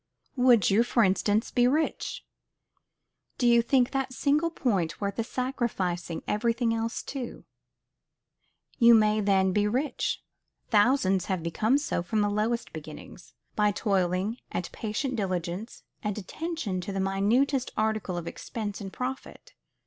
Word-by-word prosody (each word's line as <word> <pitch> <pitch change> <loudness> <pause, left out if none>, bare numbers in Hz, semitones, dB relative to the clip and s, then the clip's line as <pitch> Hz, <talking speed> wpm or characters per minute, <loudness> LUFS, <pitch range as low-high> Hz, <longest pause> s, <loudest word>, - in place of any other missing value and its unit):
Would 245 -7 +5
you, 205 +4 +5
for 240 -1 +2
instance, 205 +3 +1
be 245 -1 +3
rich: 305 +5 -1 1.1
Do 250 - 0
you 235 0 +6
think 250 +1 +2
that 270 -1 -2
single 300 +4 +2
point 195 - -1
worth 200 -1 -3
the 230 - 0
sacrificing 220 -10 -2
everything 230 +2 +1
else 230 +1 -2
to? 260 -4 -6 1.3
You 235 -1 +8
may 215 -1 +3
then 190 -2 +2
be 210 +1 +2
rich. 260 +7 -1 0.5
Thousands 205 -4 +3
have 185 -4 -2
become 215 +10 +2
so 290 -10 -1
from 215 +5 -1
the 205 0 +1
lowest 220 +3 -1
beginnings, 155 +2 -10 0.2
by 210 -1 +3
toil, 195 -3 +1 0.4
and 180 - -3
patient 240 +4 -3
diligence, 185 +2 -3 0.2
and 210 -1 -3
attention 215 - -4
to 190 - -5
the 195 - -3
minutest 230 +8 +1
article 215 -4 -1
of 170 - -4
expense 210 +2 -5
and 195 -1 -6
profit. 265 - -6
215 Hz, 140 wpm, -28 LUFS, 195-250 Hz, 1.3 s, You